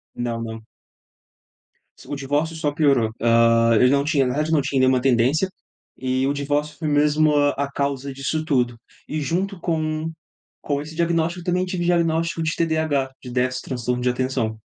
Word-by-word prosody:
Não, 120 -1 -3
não. 110 -1 -6 1.4
S - - -15
o 145 - -4
divórcio 145 +4 -1
só 150 -2 -1
piorou, 140 -7 +2
hã, 115 0 +4
eu 125 - +5
não 140 0 +3
tinha 145 -3 +2
nada, 150 +5 -1
não 155 -3 +3
tinha 140 -1 -1
nenhuma 130 -1 +3
tendência 135 +8 +2 0.5
e 130 0 0
o 140 - +1
divórcio 145 +1 -2
foi 160 - -3
mesmo 150 +1 +3
a 145 -1 +1
causa 140 -1 -2
disso 140 +4 -2
tudo. 125 -5 +1 0.3
E 155 - -3
junto 185 +6 -2
com 155 -1 -1 0.5
com 145 -1 -1
esse 155 +2 -9
diagnóstico 170 +1 0
eu - - -13
também 180 +1 +1
tive 180 -2 -3
diagnóstico 165 -1 +1
de 160 0 -1
TDAH, 160 -5 0
de 125 - -9
déficit 130 +1 -1
transtorno 125 -1 -2
de 125 - +1
atenção. 125 -3 -2
145 Hz, 170 wpm, -22 LUFS, 130-160 Hz, 1.4 s, eu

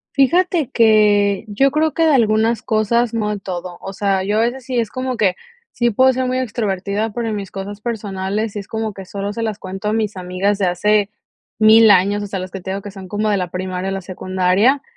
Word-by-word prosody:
Fíjate 330 +2 +2
que 210 -3 +3
yo 270 +7 +2
creo 310 +1 +1
que 330 - +2
de 315 - +4
algunas 225 -2 +2
cosas, 230 +1 +1
no 210 -2 -1
de 210 - -4
todo, 180 -2 -6
o 195 - -7
sea, 195 -1 0
yo 205 +3 -1
a - - +3
veces 245 +3 -1
sí 255 0 -3
es 230 -3 -1
como 255 -1 -3
que 200 -5 +2 0.4
sí 240 0 +1
puedo 260 +4 +4
ser 255 0 -1
muy 255 0 -1
extrovertida, 210 -3 -2
pero 230 +1 -3
en 215 - -2
mis 200 -2 -5
cosas 200 +1 -7
personales, 210 -2 -3
sí 205 - -5
es 200 - -9
como 220 -1 -3
que 195 0 -9
solo 200 +2 -5
se 230 - -4
las 220 -3 -2
cuento 195 +1 -6
a 210 - +1
mis 215 -2 -1
amigas 185 +3 -1
de 190 - +2
hace 205 +3 +2 0.5
1000 220 +1 +7
años, 200 +1 +4
o 205 - -4
sea, 195 - -4
los 185 0 -6
que 195 - -7
te 190 - -7
digo 195 +1 -4
que 205 - -7
son 190 -1 -10
como 210 +3 -2
de 205 - +2
la 180 -2 -3
primaria 185 +1 -4
o - - -3
la 195 - -4
secundaria, 185 +8 +1
210 Hz, 240 wpm, -19 LUFS, 195-230 Hz, 0.5 s, 1000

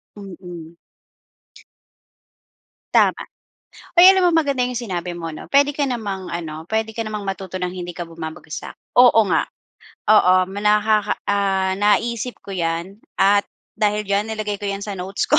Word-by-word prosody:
Mm. 175 -4 -10 2.2
Tama. - - +4 0.7
Hoy, 360 +2 +9
alam 380 -1 +4
mo - - +4
maganda 280 -6 +2
yung 250 - -5
sinabi 180 -6 -4
mo 165 -1 -5
'no. 155 - -9
Puwede 285 +1 +4
ka 290 -1 -1
namang 205 -7 -4
ano, 160 -2 -6
puwede 220 +2 -1
ka 225 0 -5
namang 215 -1 -4
matuto 195 -1 -6
ng 180 -1 -2
hindi 175 -1 -7
ka 175 - -5
bumabagsak. 160 -2 -8 0.2
Oo 245 -3 +7
nga, 160 - +2 0.6
oo 185 -4 +6 0.2
nakaka 210 +1 +2 0.2
ah, 190 -1 +1
naisip 230 +3 0
ko - - -11
'yan 170 +1 -3 0.2
at 200 +1 +3 0.3
dahil 210 0 +1
diyan 200 +1 0
nilagay 210 -2 -3
ko 205 - -5
'yan 200 0 -3
sa 200 -2 -5
notes 190 +2 -3
ko. - - +6
200 Hz, 150 wpm, -21 LUFS, 180-220 Hz, 2.2 s, Hoy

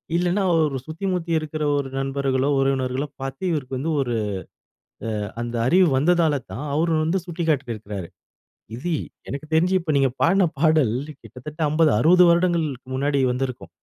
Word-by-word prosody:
இல்லன்னா 180 +3 +1
ஒரு 150 -4 +1
சுத்தி 160 +5 -6
முத்தி 170 -2 -3
இருக்கிற 155 0 -4
ஒரு 135 -1 -2
நண்பர்களோ, 135 0 0
உறவினர்களோ, 135 +1 0
பார்த்து 135 +5 -6
இவருக்கு 135 -4 -3
வந்து 160 +5 -2
ஒரு 120 -3 -1 1.1
அ - - -6
அந்த 120 0 -5
அறிவு 180 +4 +5
வந்ததால 160 -1 +2
தான் 140 +6 -5
அவர் 165 +2 +1
வந்து 180 +4 0
சுட்டிக்காட்டியிருக்கிறாரு. 120 - -3 0.7
இது 170 +7 -3 0.4
எனக்கு 140 +2 -5
தெரிஞ்சு 180 +4 +3
இப்ப 160 -2 -2
நீங்க 135 -2 +3
பாடின 185 +2 +4
பாடல். 155 -8 +3 0.3
கிட்டத்தட்ட 150 +6 -10
50, 155 0 +3
60 180 +3 +6
வருடங்களுக்கு 165 -7 0
முன்னாடி 140 +1 +1
வந்திருக்கும். 130 0 -4
150 Hz, 145 wpm, -23 LUFS, 135-165 Hz, 1.1 s, 60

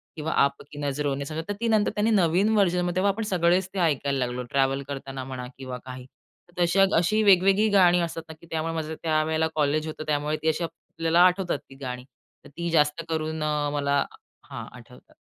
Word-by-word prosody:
किंवा 160 +1 -3
आप 140 0 +2
की 145 - -11
नजरो 145 0 -1
ने 140 - -4
समझा, 155 +2 -4
तर 205 - -2
ती 235 - -1
नंतर 215 -2 +2
त्यांनी 215 +2 +1
नवीन 190 +1 +3
व्हर्जनमध्ये, 180 -3 +2
तेव्हा 200 +2 +3
आपण 225 +3 -4
सगळेच 180 +1 +2
ते 195 - -3
ऐकायला 140 -4 +1
लागलो. 125 +1 -4
ट्रॅव्हल 135 0 +1
करताना 135 -1 -6
म्हणा 130 -1 -6
किंवा 130 -2 -6
काही. 130 -1 -8 0.5
तशा, 175 +3 +4
अशी 215 +6 +2
वेगवेगळी 195 +2 +5
गाणी 180 -2 +5
असतात 165 -1 -3
ना 160 - -7
की 170 - -15
त्यामुळे 165 0 -2
माझं 160 -1 -4
त्यावेळेला 160 0 +1
कॉलेज 155 +1 +1
होतं, 155 0 -6
त्यामुळे 150 +1 0
ती 160 - -2
अशी 160 +2 -1
आपल्याला 165 0 -2
आठवतात 180 -2 +1
ती 135 - -13
गाणी. 125 -1 -5 0.4
तर - - -12
ती 170 0 -2
जास्त 150 -1 +2
करून 160 -1 -2
अ, 150 -1 0
मला 140 -1 +1 0.5
हां, - - -6
आठवतात. - - -17
160 Hz, 195 wpm, -25 LUFS, 140-180 Hz, 0.5 s, वेगवेगळी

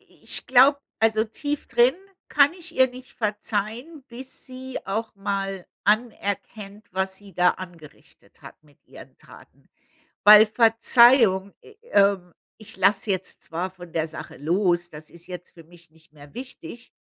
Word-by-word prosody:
I - - -28
ich - - -1
glaube 270 +3 +5 0.2
also, 220 0 +2
tief 290 +6 -5
drin 240 +3 +4 0.3
kann 285 +2 +4
ich 345 -2 -8
ihr 260 0 +4
nicht 255 +2 -13
verzeihen, 220 +7 -4
bis 255 +3 -11
sie 260 0 -7
auch 220 +3 -4
mal 195 -2 -4 0.2
anerkennt, 210 -1 -2
was 190 0 -2
sie 200 -1 -15
da 180 0 +4
angerichtet 170 -5 -14
hat - - -14
mit 145 -2 -27
ihren - - -15
Taten. - - -19 0.6
Weil 210 +1 +9
Verzeihung 225 -2 +4
äh, 430 - -17 0.2
ähm, 195 -3 +2 0.3
ich 220 -1 -8
lass 195 +2 +2
jetzt 190 -2 -4
zwar 175 +3 -4
von 175 -2 -14
der 160 0 -1
Sache 160 - -10
los, 175 +2 0
das 150 0 -12
ist 170 0 -14
jetzt 180 -1 -10
für 165 -2 -15
mich 170 -1 -19
nicht 160 0 -23
mehr 145 -1 -16
wichtig, 250 -1 -10
205 Hz, 155 wpm, -24 LUFS, 180-240 Hz, 0.6 s, Weil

